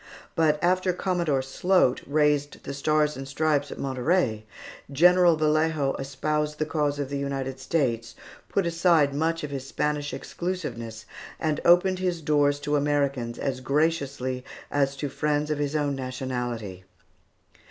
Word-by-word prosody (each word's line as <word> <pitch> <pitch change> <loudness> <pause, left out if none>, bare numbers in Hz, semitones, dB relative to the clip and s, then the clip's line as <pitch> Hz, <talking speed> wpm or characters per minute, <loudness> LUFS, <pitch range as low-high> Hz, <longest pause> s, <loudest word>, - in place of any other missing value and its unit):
But 155 -2 +3
after 185 +1 +2
Commodore 170 -7 0
Sloat 135 +1 +2
raised 145 -1 +1
the 140 - -5
Stars 150 +1 +1
and 135 0 -7
Stripes 145 0 0
at - - -7
Monterey, 130 -4 0 0.5
General 175 +3 +5
Vallejo 155 -2 +1
espoused 150 +3 -2
the 155 - 0
cause 150 -2 0
of 140 -2 -3
the 140 0 -3
United 135 -1 -3
States, 120 -6 -1 0.3
put 195 - +1
aside 165 -4 +3
much 165 +3 0
of 150 - -4
his 135 -1 -5
Spanish 150 0 -1
exclusiveness, 115 -12 -5 0.3
and 155 -2 -1
opened 185 +2 +5
his 180 -2 -1
doors 145 -1 +2
to 145 0 0
Americans 140 -5 0
as 135 -2 -2
graciously 140 -3 -1 0.3
as 140 -1 +1
to 145 +1 -3
friends 150 +2 -1
of 150 - -1
his 145 +1 -1
own 145 -2 0
nationality. 125 -7 -4
145 Hz, 140 wpm, -26 LUFS, 135-160 Hz, 0.5 s, General